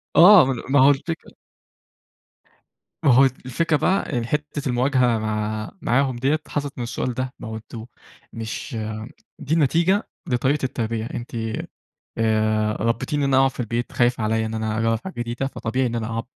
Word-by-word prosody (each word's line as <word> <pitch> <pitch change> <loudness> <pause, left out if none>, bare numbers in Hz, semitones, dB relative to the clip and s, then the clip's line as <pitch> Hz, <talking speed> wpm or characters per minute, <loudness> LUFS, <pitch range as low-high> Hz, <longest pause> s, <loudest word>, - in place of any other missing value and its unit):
آه، 180 -3 +9
ما 130 -3 -2
ما 145 +1 +4
هو 135 +2 +7
الفكرة 160 +4 -2 1.7
ما 140 - +5
هو 130 +3 +7 0.2
الفكرة 155 +5 +1
بقى 185 -6 0
إن 115 - -1
حتة 150 +1 -3
المواجهة 125 -1 +2
مع 110 0 -3
معاهم 130 +1 +1
ديَّة 135 +6 +1
حصلت 145 -1 -3
من 125 - -3
السؤال 120 +1 -3
ده، 130 +1 -3
ما - - -7
هو 110 - -5
أنتم 110 0 -8 0.5
مش 115 +3 -5 0.6
دي 145 +3 -2
النتيجة، 170 - +2 0.2
لطريقة 130 +4 +1
التربية. 115 -3 -2
أنتِ 120 - -6 0.9
آآ 110 -1 +2
رَبّيتيني 120 +6 0
إن - - +1
أنا 135 - +3
أقعد 135 - +4
في 130 - -8
البيت، 120 +1 -3
خايفة 120 -2 +1
عليَّ 110 +1 +1
إن 110 - -5
أنا 110 0 -2
أجرب 115 0 +1
حاجة 190 - -6
جديدة، 120 +3 -2
فطبيعي 130 -1 -2
إن 120 - -2
أنا 115 -2 -2
أقعد 115 0 -3
125 Hz, 170 wpm, -23 LUFS, 115-140 Hz, 1.7 s, آه